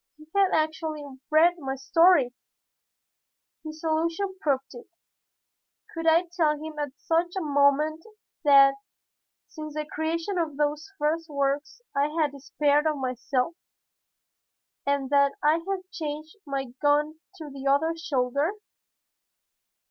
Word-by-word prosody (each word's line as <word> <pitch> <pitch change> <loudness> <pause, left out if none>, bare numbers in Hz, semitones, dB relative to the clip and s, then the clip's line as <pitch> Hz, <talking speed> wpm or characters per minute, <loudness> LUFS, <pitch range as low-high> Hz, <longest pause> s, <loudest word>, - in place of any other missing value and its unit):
He 305 - -15
had 390 -1 +4
actually 315 -1 -1 0.2
read 340 +3 +4
my 270 -2 -3
story! 275 -1 +4 1.3
His 310 0 -9
allusion 335 +4 -1
proved 275 -4 -1
it. 240 - -11 1.1
Could 330 -1 -3
I 325 +2 +5
tell 305 -4 +2
him 310 0 -7
at 290 -2 -4
such 340 +2 0
a - - 0
moment 295 +2 +2 0.4
that 275 -2 +6 0.7
since 305 -2 -8
the 305 0 -2
creation 330 +5 -2
of 310 -4 -2
those 300 +4 -1
first 320 +2 -1
works 285 - -2
I 280 +1 +3
had 300 -2 +2
despaired 290 +2 +1
of 305 - +1
myself, 255 +3 -1 1.3
and 280 -1 0
that 280 -1 +4
I 305 +2 +4
had 380 -1 -4
changed 310 0 -5
my 270 -3 -3
gun 300 +1 +2 0.2
to 310 -6 -9
the 275 0 -6
other 315 +4 +2
shoulder? 290 0 0
305 Hz, 125 wpm, -26 LUFS, 280-325 Hz, 1.3 s, that